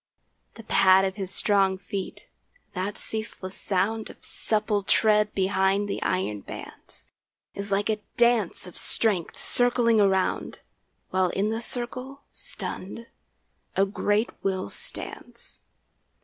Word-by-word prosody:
The 225 - -10
pad 190 -2 +5
of 190 - -1
his 190 -2 -3
strong 195 -1 +2
feet, 190 0 -6 0.5
that 190 +3 -3
ceaseless 220 -4 -5
sound 210 +4 0
Of - - -13
supple 210 -1 0
tread 210 +1 +3
behind 195 +1 +2
the 200 - -3
iron 145 - 0
bands, - - -10 0.5
Is 200 +1 -5
like 200 +1 +1
a 215 -1 0 0.2
dance 235 -7 +3
of 180 - -11
strength 200 -7 +1
circling 240 -2 +3
around, 190 -2 +1 0.5
While 185 -1 +2
in 205 +4 0
the 225 +1 -2
circle, 255 +3 -4
stunned, 205 +5 -6 0.7
a 195 - +4
great 205 +2 +1
will 190 - -1
stands. - - -7
200 Hz, 120 wpm, -26 LUFS, 190-220 Hz, 0.7 s, pad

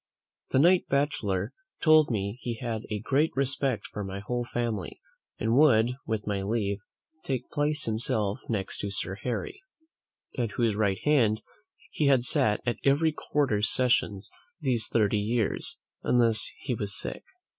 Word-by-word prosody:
The - - +1
knight 175 +6 +5
bachelor 115 -8 0 0.3
told 155 -2 +5
me 100 0 -2
"he 120 -1 -3
had 115 -3 -4
a 105 - -2
great 140 +7 +2
respect 135 -2 0
for 105 - -6
my 95 0 -5
whole 120 +5 -2
family, 115 -6 -3 0.4
and 115 +2 +1
would, 125 -5 +5 0.2
with 110 -2 -2
my 100 -2 -1
leave, 100 -1 -1 0.7
place 150 +1 0
himself 110 -2 -1
next 100 -4 -2
to 100 - -3
Sir 100 -1 -2
Harry, 385 - -4 0.7
at 115 -4 -2
whose 115 -4 +1
right 100 -3 +1
hand 120 -8 +3 0.5
he 150 - +1
had 135 -3 +4
sat 105 -3 +2
at 120 -3 -1
every 145 +4 +3
quarter 140 -8 0
sessions 110 -3 +2 0.3
these 130 -7 0
thirty 105 -2 +2
years, 110 +1 0 0.2
unless 115 -3 +2
he 125 - -2
was 105 -2 -3
sick." - - -5
115 Hz, 145 wpm, -28 LUFS, 105-135 Hz, 0.7 s, knight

